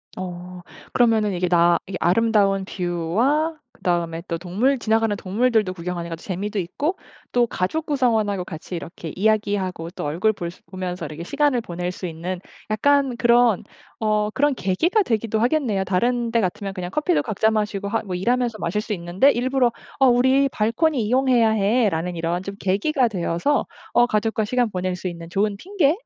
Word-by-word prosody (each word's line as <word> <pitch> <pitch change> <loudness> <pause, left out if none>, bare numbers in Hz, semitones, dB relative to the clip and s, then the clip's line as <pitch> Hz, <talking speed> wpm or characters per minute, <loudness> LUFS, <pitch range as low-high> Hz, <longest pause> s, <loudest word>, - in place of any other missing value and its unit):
어 180 0 -7 0.3
그러면은 220 -4 +3
이게 180 0 0
나 170 0 +4
이렇게 190 -1 -5
아름다운 195 0 +2
뷰와 210 - 0
그다음에 170 -2 -2
또 170 - -2
동물 215 +10 +1
지나가는 225 -1 +1
동물들도 215 +1 +1
구경하는 175 -1 -5
것도 165 0 -6
재미도 200 +3 -4
있고 280 - -2 0.3
또 245 -1 +3
가족 235 - -2
구성원하고 225 - +1
같이 175 0 -7
이렇게 165 -1 -7
이야기하고 200 -4 0
또 180 - -6
얼굴 175 +9 +1
볼 175 -4 -5
수 175 - -15
보면서 180 -2 -5
이렇게 155 +2 -7
시간을 285 +1 +1
보낼 175 -2 -4
수 180 0 -6
있는 175 +2 -5 0.3
약간 275 +3 +2
그런 235 -3 +4 0.4
어 215 -1 +1
그런 290 +3 +1
계기가 330 - +1
되기도 225 - -1
하겠네요. 240 -5 +1
다른 235 +6 0
데 230 0 +2
같으면 195 +1 -3
그냥 180 -2 -5
커피도 305 - +1
각자 220 0 +1
마시고 210 -2 -1
하 225 +2 0
뭐 185 - -3
일하면서 240 +4 0
마실 185 +4 -1
수 215 - -4
있는데 175 +7 +2
일부러 255 0 +1 0.3
'어 270 - +6
우리 260 +3 +4
발코니 255 +7 +1
이용해야 250 -1 +3
해.'라는 200 -5 +1
이런 170 +1 -1
좀 200 +1 -6
계기가 245 - +1
되어서 180 +7 0 0.3
어 240 - +5
가족과 220 -1 0
시간 245 +1 +1
보낼 185 -1 -2
수 180 - -5
있는 170 -1 -9
좋은 200 +3 0
핑계 345 - +1
210 Hz, 380 characters per minute, -22 LUFS, 180-245 Hz, 0.4 s, 어